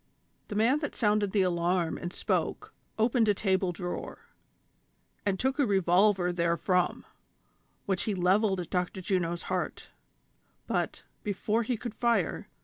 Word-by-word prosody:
" - - -43
The 205 - -5
man 235 +7 +3
that 290 - -4
sounded 210 -3 +2
the 200 -2 +3
alarm 175 -1 0
and 175 - -5
spoke, - - -2 0.2
opened 225 +1 +3
a 205 - +4
table 190 -2 +1
drawer, 175 +1 -6 1.0
and 190 -2 +1
took 265 +2 0
a 285 - +4
revolver 190 -1 +3
therefrom, 170 +1 +1 0.8
which 190 -2 0
he 210 - 0
levelled 190 +2 +2
at 175 - -6
Dr. 180 +1 -1
Juno's 175 -3 -1
heart; - - -3 0.7
but, - - -2 0.2
before 210 +2 0
he 235 +1 -1
could 235 0 -6
fire. 230 -6 0
190 Hz, 140 wpm, -29 LUFS, 180-215 Hz, 1.0 s, a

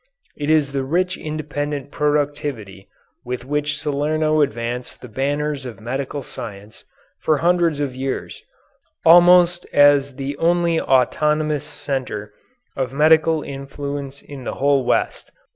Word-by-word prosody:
It 145 0 -3
is 155 -3 +3
the 135 -1 -1
rich 180 +7 0
independent 145 -2 -4
productivity 145 - -2 0.3
with 125 0 -5
which 150 +1 -1
Salerno 155 +1 +1
advanced 120 -1 -3
the 125 - -10
banners 145 +4 -2
of 120 -6 -8
medical 135 +4 -4
science 105 -3 -9 0.3
for 155 - +2
hundreds 170 -2 +2
of 140 -3 -2
years 130 +1 -4 0.6
almost 175 +1 +6
as 145 -1 +4
the 140 +1 -4
only 170 0 +2
autochthonous 150 +3 +1
centre 105 -7 -5 0.4
of 130 -2 -2
medical 155 +2 +3
influence 140 0 -6
in 140 -3 -10
the - - -4
whole 140 -1 +2
West. - - -1
145 Hz, 125 wpm, -21 LUFS, 135-155 Hz, 0.6 s, almost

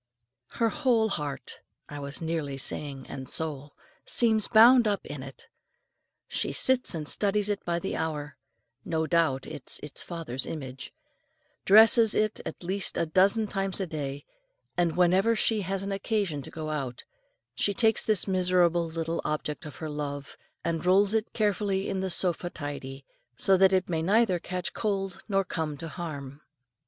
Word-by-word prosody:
Her 230 -1 +2
whole 240 -6 +2
heart 145 -7 -4 0.3
I 145 - -8
was 140 +3 -4
nearly 160 -4 -2
saying 135 -1 -3
"and 130 -2 -7
soul" 150 -3 -2 0.3
seems 220 -3 +2
bound 235 +2 +7
up 200 -2 -1
in 145 -2 -7
it. 135 0 -11 0.8
She - - -2
sits 260 -7 +3
and 155 -2 -5
studies 205 +3 +1
it 205 -1 -2
by 170 -1 0
the 190 +3 -3
hour 150 -3 -3 0.5
no 160 -1 -1
doubt 160 -5 +1
it 130 - -8
is - - +1
its 150 - -3
father's 160 -7 -4
image 130 -5 -7 0.7
dresses 220 +2 +7
it 215 0 0
at - - -8
least 190 +2 0
a - - +1
dozen 195 +7 +3
times 195 -2 -2
a 190 - -1
day, 145 -4 -5 0.5
and 175 -2 0
whenever 185 +6 +4
she 215 0 +1
has 195 +1 -3
occasion 195 -5 -2
to - - -10
go 155 -1 -5
out, 135 -5 -4 0.5
she 170 +10 0
takes 220 +1 +2
this 215 -3 +1
miserable 180 -2 +2
little 165 0 -3
object 150 0 -3
of 150 - -10
her 160 - -6
love, 145 -1 -5 0.3
and 165 -1 -1
rolls 195 +3 +4
it 220 0 0
carefully 205 -2 0
in 195 - -2
the 190 0 -2
sofa 175 0 +1
tidy, 140 -3 -7 0.3
so 195 - +4
that 190 0 +5
it 185 -1 +1
may 165 -2 -1
neither 195 +1 +2
catch 180 +1 -5
cold 195 -3 -2
nor 195 -1 +2
come 160 -5 -3
to 165 - -7
harm. 145 -5 -7
175 Hz, 165 wpm, -28 LUFS, 150-200 Hz, 0.8 s, bound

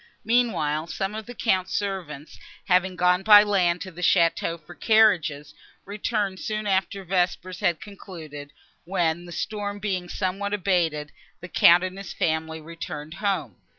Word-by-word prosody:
Meanwhile, 170 -10 +1
some 195 +3 -3
of 220 +1 -6
the 245 - -9
Count's 190 -5 0
servants, 175 -8 -4 0.3
having 185 0 +2
gone 180 +1 +3
by 210 0 +8
land 180 -4 +1
to 185 - -6
the 175 +1 -10
château 170 -1 +2
for 165 +3 -14
carriages, 175 -10 +2 0.3
returned 205 -1 -2
soon 215 0 -3
after 195 0 0
vespers 180 0 -1
had 170 -2 +1
concluded, 160 -8 -10 0.3
when, 175 -2 -1
the 175 - -10
storm 205 +2 -4
being 190 -4 -3
somewhat 200 +2 -2
abated, 165 -6 0 0.3
the 175 - -9
Count 175 +1 +6
and 185 +1 -4
his 195 - -7
family 160 0 -1
returned 155 -1 -7
home. 170 - -1
180 Hz, 150 wpm, -25 LUFS, 165-200 Hz, 0.3 s, by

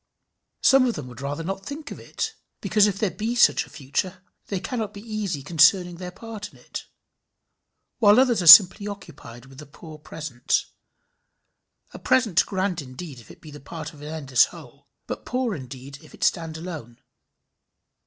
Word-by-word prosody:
Some 270 -1 +5
of 235 - -1
them 150 - -6
would 125 +1 -11
rather 145 +3 -4
not 195 +3 -5
think 290 +6 -8
of - - -8
it, 445 0 -5 0.3
because 210 -1 +3
if 200 -2 -2
there 210 -3 -1
be 220 +7 -3
such 240 - +4
a - - -18
future, 170 +6 -4 0.2
they 195 - -3
cannot 220 +1 -4
be 200 - -9
easy 210 -9 -4
concerning 175 +3 +3
their 180 0 -7
part 215 +2 -9
in - - -19
it; - - -9 1.1
while 210 0 +6
others 250 -6 +3
are 175 - -2
simply 200 +3 +9
occupied 125 - -10
with 135 0 -15
the 150 - -11
poor 155 +1 -13
present 150 -5 -2 1.3
a - - -9
present 235 -9 +2
grand 190 -3 -2
indeed 135 +1 -9
if 115 - -17
it - - -15
be 155 - -12
the 145 - -11
part 155 +2 -8
of 145 - -15
an 150 - -8
endless 140 -6 +2
whole, - - -15 0.2
but - - -6
poor 250 -2 -2
indeed 135 -1 -9
if - - -16
it - - -7
stand 165 -3 0
alone. 160 -9 -8
175 Hz, 180 wpm, -24 LUFS, 145-210 Hz, 1.3 s, simply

